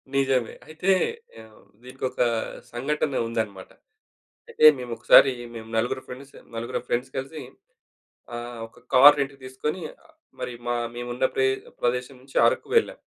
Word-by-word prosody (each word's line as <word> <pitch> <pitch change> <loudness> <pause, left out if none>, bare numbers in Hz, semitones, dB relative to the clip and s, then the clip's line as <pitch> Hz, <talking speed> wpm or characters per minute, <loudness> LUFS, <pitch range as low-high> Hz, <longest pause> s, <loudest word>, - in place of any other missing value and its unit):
నిజమే. 135 -3 +1
అయితే 165 +5 0 0.5
ఆహ్, 110 -1 -18 0.2
దీనికొక 130 0 -6 0.5
సంఘటనుందనమాట. 115 -7 -2 0.8
అయితే 155 - +4
మేమొకసారి 125 +2 +5 0.2
మేము 110 0 -9
నలుగురు 125 +3 0
ఫ్రెండ్స్ 135 +2 -11 0.2
నలుగురం 115 +1 -3
ఫ్రెండ్స్ 125 +2 -2
కలిసి 135 +3 -5 0.9
ఆహ్, 120 0 -7
ఒక - - -22
కార్ 145 +3 +9
రెంట్‌కి 135 0 -3
తీసుకొని 150 +7 -4 0.6
మరి 125 - -4
మ - - -2 0.3
మేమున్న 120 +1 -2
ప్రే 130 0 +3 0.3
ప్రదేశం 125 +2 -1
నుంచి 135 - -7
అరకు - - -1
వెళ్ళాం. 455 - +1
130 Hz, 120 wpm, -25 LUFS, 120-135 Hz, 0.9 s, కార్